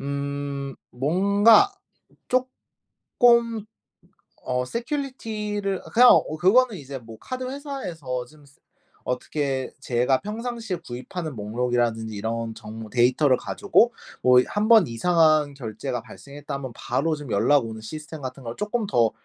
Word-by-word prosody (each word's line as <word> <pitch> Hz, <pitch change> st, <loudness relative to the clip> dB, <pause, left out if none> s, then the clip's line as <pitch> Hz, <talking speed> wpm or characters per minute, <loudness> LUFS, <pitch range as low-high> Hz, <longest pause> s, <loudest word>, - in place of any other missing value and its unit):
음 140 Hz, 0 st, -4 dB, 0.2 s
뭔가 200 Hz, -, +4 dB, 0.6 s
쪼끔 235 Hz, -2 st, 0 dB, 0.8 s
어 125 Hz, 0 st, -1 dB
security 225 Hz, -, -4 dB
를 195 Hz, -2 st, -2 dB
그냥 245 Hz, +2 st, +8 dB
어 155 Hz, -, +3 dB
그거는 225 Hz, +7 st, +4 dB
이제 140 Hz, -3 st, -7 dB
뭐 115 Hz, -2 st, -12 dB
'카드 255 Hz, 0 st, -5 dB
회사에서 175 Hz, -, -5 dB
좀 150 Hz, +3 st, -19 dB, 0.6 s
어떻게 130 Hz, +1 st, -2 dB
제가 125 Hz, +2 st, +1 dB
평상시에 225 Hz, -1 st, -4 dB
구입하는 140 Hz, +5 st, -6 dB
목록이라든지 115 Hz, 0 st, -1 dB
이런 115 Hz, +2 st, -3 dB
정보 110 Hz, 0 st, -9 dB
데이터를 130 Hz, +3 st, +3 dB
가지고 230 Hz, +4 st, +2 dB, 0.3 s
뭐 125 Hz, 0 st, +7 dB
1 210 Hz, +1 st, -1 dB
번 225 Hz, -7 st, +7 dB
이상한 155 Hz, +3 st, +3 dB
결제가 120 Hz, 0 st, -5 dB
발생했다면 140 Hz, -3 st, -8 dB
바로 155 Hz, +6 st, -1 dB
좀 145 Hz, -4 st, -9 dB
연락 120 Hz, +6 st, +3 dB
오는 110 Hz, -1 st, -8 dB
시스템 155 Hz, +6 st, -8 dB
같은 130 Hz, 0 st, -6 dB
걸 115 Hz, 0 st, -6 dB
조금 210 Hz, +1 st, -2 dB
더 115 Hz, -, +3 dB
145 Hz, 280 characters per minute, -24 LUFS, 125-210 Hz, 0.8 s, 그냥